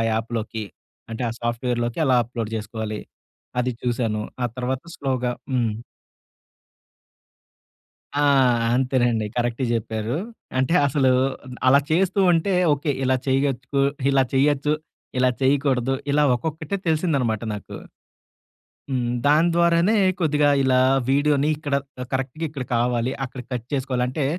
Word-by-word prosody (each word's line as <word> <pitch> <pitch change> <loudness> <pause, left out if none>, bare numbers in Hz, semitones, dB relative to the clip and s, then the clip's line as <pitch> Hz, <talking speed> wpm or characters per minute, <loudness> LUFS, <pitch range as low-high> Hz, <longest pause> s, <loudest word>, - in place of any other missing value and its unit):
యాప్‌లోకి? 110 -1 -3 0.5
అంటే 115 +2 -4
ఆ - - -4
సాఫ్ట్‌వేర్‌లోకి 120 +1 -2
ఎలా 130 - +4
అప్లోడ్ 115 -2 -5
జేసుకోవాలి? 110 0 -5 0.6
అది 125 +1 0
చూశాను. 115 -3 -1 0.2
ఆ - - +3
తర్వాత 125 +1 -2
స్లోగా 130 -3 -1 0.2
హ్మ్. 120 -3 +1 2.5
ఆ! - - +3 0.5
అంతేనండి. 120 -4 +1
కరెక్ట్ 120 +1 -1
జెప్పారు. 110 +1 -2 0.4
అంటే 130 +7 +1
అసలు 135 -1 +2 0.4
అ - - -10 0.2
అలా 140 +2 +6
చేస్తూ 190 +4 +2
ఉంటే 175 +3 +1 0.2
ఓకే. 145 +1 -1
ఇలా 130 0 +3
చేయగచ్చుకు 135 0 0 0.3
ఇలా 135 -1 +4
చేయొచ్చు. 145 +2 +2 0.5
ఇలా 130 0 +4
చేయకూడదు. 135 -2 +2 0.2
ఇలా 150 +1 +3
ఒక్కొక్కటే 155 +6 -3
తెలిసిందన్నమాట 145 - +1
నాకు. 105 - -8 1.2
హ్మ్. 125 -2 0
దాని 155 +4 +4
ద్వారానే 170 +5 +3 0.2
కొద్దిగా 150 -2 +3
ఇలా 130 -1 +3 0.3
వీడియో‌ని 145 +1 +3
ఇక్కడ 145 -2 -4 0.3
ఆహ్, 125 - -5
కరెక్ట్‌గా 135 +5 -2
ఇక్కడ 140 -4 -5
కావాలి. 120 +1 0
అక్కడ 125 0 -8
కట్ 120 -1 -4
చేసుకోవాలి. 130 -2 -1
అంటే 135 +2 -2
130 Hz, 120 wpm, -23 LUFS, 120-145 Hz, 2.5 s, అలా